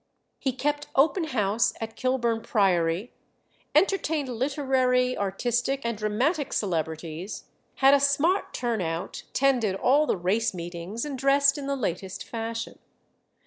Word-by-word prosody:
He 265 - 0
kept 290 +3 -2
open 320 +5 +3
house 220 -6 +1
at 225 0 -6
Kilburn 240 -3 0
Priory; 185 -1 +1 0.6
entertained 320 -8 +2
literary, 255 -1 +1
artistic, 240 +7 -1
and 235 -1 -1
dramatic 255 - 0
celebrities; 165 0 -3 0.3
had 270 +1 +5
a 280 - +6
smart 285 +7 +2
"turn 235 -4 -2
out," 165 +1 -4
attended 250 -8 +2
all 280 +9 +3
the - - +1
race 195 +4 0
meetings, 175 - -5
and 280 -3 -5
dressed 275 +1 +4
in 280 -2 -5
the 280 - 0
latest 190 -6 -3
fashion. 230 0 -5
240 Hz, 130 wpm, -26 LUFS, 200-275 Hz, 0.6 s, a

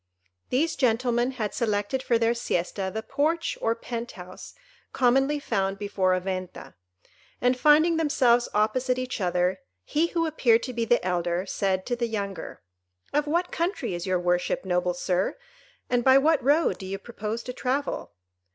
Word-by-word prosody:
These 315 +6 +1
gentlemen 245 0 +1
had 215 -5 -3
selected 215 +2 -1
for 235 -2 +2
their 230 0 +2
siesta 190 -4 -2
the 220 +2 -4
porch 310 +7 0
or 225 0 +1
penthouse 230 -6 -8 0.4
commonly 270 +3 +3
found 195 -7 -1
before 195 -2 +1
a - - 0
Venta; 185 -1 -5 0.7
and, 250 +1 +2
finding 305 +5 +4
themselves 255 -6 +3
opposite 250 +5 +1
each 255 -3 -4
other, 180 +1 0 0.2
he 320 +3 +1
who 335 -1 0
appeared 245 -8 +3
to 255 - -4
be 230 -1 -1
the 240 -4 +2
elder 175 0 0
said 190 -1 -1
to 245 - -1
the 235 0 -1
younger, 200 - -5 0.5
"Of 295 +1 +1
what 345 +4 0
country 335 - -2
is 175 +1 -4
your 185 -1 +1
worship, 180 +2 0
noble 180 -1 0
Sir, 180 - -1 0.5
and 245 -1 +1
by 265 +1 +7
what 305 +2 +3
road 295 +5 +2
do 190 - -7
you 195 +1 -3
propose 220 +1 -5
to 250 - -6
travel?" 265 - -2
235 Hz, 160 wpm, -26 LUFS, 190-265 Hz, 0.7 s, by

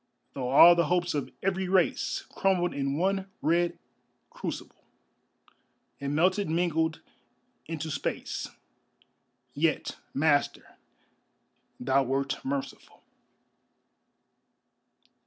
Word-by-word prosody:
Though 125 -2 -3
all 165 +6 +9
the 170 0 +1
hopes 175 -1 +1
of 145 -2 -2
every 190 0 0
race 185 -3 +1
Crumbled 180 -2 +1
in 140 0 -2
one 195 +2 0
red 170 +2 +1 0.5
crucible, - - -7 1.2
And 140 +1 -3
melted 185 +4 +2
mingled 160 -1 0 0.7
into 160 0 -4
space, 140 - -3 1.0
Yet, 155 +3 0 0.2
Master, 145 0 +1 1.0
thou 130 +2 +2
wert 135 +2 -2
merciful. 135 0 -5
160 Hz, 85 wpm, -28 LUFS, 140-175 Hz, 1.2 s, all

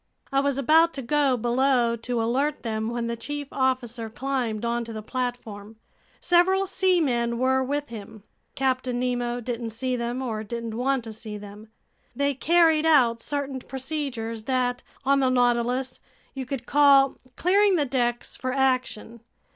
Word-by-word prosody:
I 275 - +3
was 280 -1 0
about 320 +5 +4
to 270 - -5
go 275 0 +2
below 240 0 +2
to 235 0 -2
alert 275 +6 0
them, 220 -1 -2
when 235 0 -2
the 235 0 -2
chief 290 +4 -5
officer 245 -4 -1
climbed 245 -3 -2
onto 235 0 -2
the 215 -1 -6
platform. 225 -4 -5 0.4
Several 375 +2 +3
seamen 315 -12 +1
were 260 +1 +2
with 285 +2 -2
him. 215 -2 -10 0.3
Captain 255 -2 0
Nemo 245 -1 -1
didn't 235 -1 -4
see 255 +3 -2
them, 240 +2 -3
or 220 -4 -3
didn't 230 +1 -5
want 260 +1 0
to 225 -1 -8
see 215 -1 -7
them. 205 +1 -11 0.5
They 280 0 +1
carried 320 +2 +3
out 240 -7 +4
certain 280 -1 -3
procedures 255 -5 -4
that, 250 -1 0 0.2
on 275 +1 +4
the 260 -1 +3
Nautilus, 245 +1 +1 0.3
you 265 -2 -6
could 255 -2 -4
call 280 -1 +5 0.2
"clearing 395 +2 +3
the 300 -4 +1
decks 240 -2 -1
for 255 - -3
action." 255 -4 -1
255 Hz, 155 wpm, -25 LUFS, 235-275 Hz, 0.5 s, call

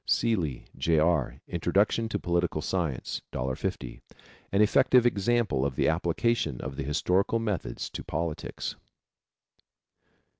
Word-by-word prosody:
Seeley, 85 - +1
J. 80 -1 +2
R., 80 -4 +2
Introduction 110 +3 +1
to 105 - -1
Political 85 -4 0
Science. 80 -9 -2
$1.50. 65 -1 -3 0.5
An 100 - +2
effective 120 +3 +5
example 115 - +2
of 70 -1 -1
the - - +2
application 85 - 0
of 65 0 -5
the - - -4
historical 90 +9 +1
methods 105 - -3
to - - -6
politics. 80 -1 -4
85 Hz, 115 wpm, -28 LUFS, 75-105 Hz, 0.5 s, effective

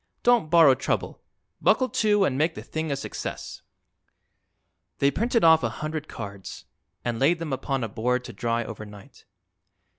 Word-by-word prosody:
Don't 240 -9 +3
borrow 165 -5 +7
trouble. - - -3 0.4
Buckle 255 - +3
to, 210 -3 +2
and 130 - 0
make 160 +4 +1
the - - -7
thing 160 0 -4
a - - +1
success." 140 - -6 1.4
They 140 0 +3
printed 230 - 0
off 160 -1 +7
a - - 0
hundred 155 0 -5
cards 100 -1 -8 0.4
and 120 -1 -2
laid 160 +6 +3
them 165 -4 -4
upon 135 -1 -2
a - - -1
board 125 +4 -1
to - - -9
dry 115 0 -1
overnight. 105 -3 -11
140 Hz, 155 wpm, -25 LUFS, 120-165 Hz, 1.4 s, borrow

